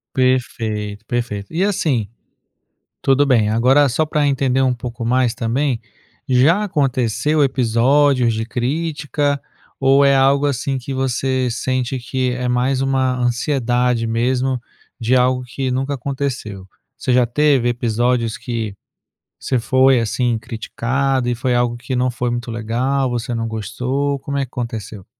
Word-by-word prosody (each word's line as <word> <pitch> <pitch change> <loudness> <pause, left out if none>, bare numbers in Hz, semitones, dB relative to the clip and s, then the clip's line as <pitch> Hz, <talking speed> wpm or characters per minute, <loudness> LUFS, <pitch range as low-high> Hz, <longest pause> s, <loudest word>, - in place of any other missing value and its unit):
Perfeito, 115 -5 -1
perfeito. 115 -4 -3
E 175 +4 0
assim, 145 - 0 0.9
tudo 135 +1 +3
bem, 115 -6 +3
agora 130 +6 +4
só 155 +6 +1
pra 150 -1 +1
entender 135 -1 +1 0.2
pouco 120 -1 -6
mais 125 0 +2
também, 125 +2 -1 0.5
já 145 +11 +4
aconteceu 145 - +1
episódios 130 0 +3
de 110 0 -2
crítica? 145 +3 -1 0.4
Ou 135 +1 +4
é 140 0 +5
algo, 135 +2 +3
assim, 140 0 -1
que 130 +2 -6
você 130 0 0
sente 130 +1 -2
que 130 0 -2
é 125 0 -3
mais 125 +2 +1
uma 130 -1 +1
ansiedade 125 -1 0
mesmo, 125 +2 0 0.4
de 120 +3 +2
algo 125 0 +2
que 130 +1 -3
nunca 135 +2 -1
aconteceu? 125 -8 -4 0.3
Você 130 - -2
já 125 0 +4
teve 135 0 +2
episódios 120 -1 0
que 115 -5 -4 0.7
você 130 - 0
foi, 130 +2 +4
assim, 115 +1 0
criticado 125 +4 -2
e 120 - +1
foi 120 +1 0
algo 120 -1 +1
que 125 +1 -4
não 125 +1 +2
foi 125 0 -2
muito 120 -1 -4
legal, 125 +4 -1
você 120 0 -3
não 115 0 -2
gostou, 125 +6 -2
como 140 +1 -3
é 140 - +1
que 130 - -12
aconteceu? 110 -5 -5
125 Hz, 145 wpm, -19 LUFS, 120-135 Hz, 0.9 s, é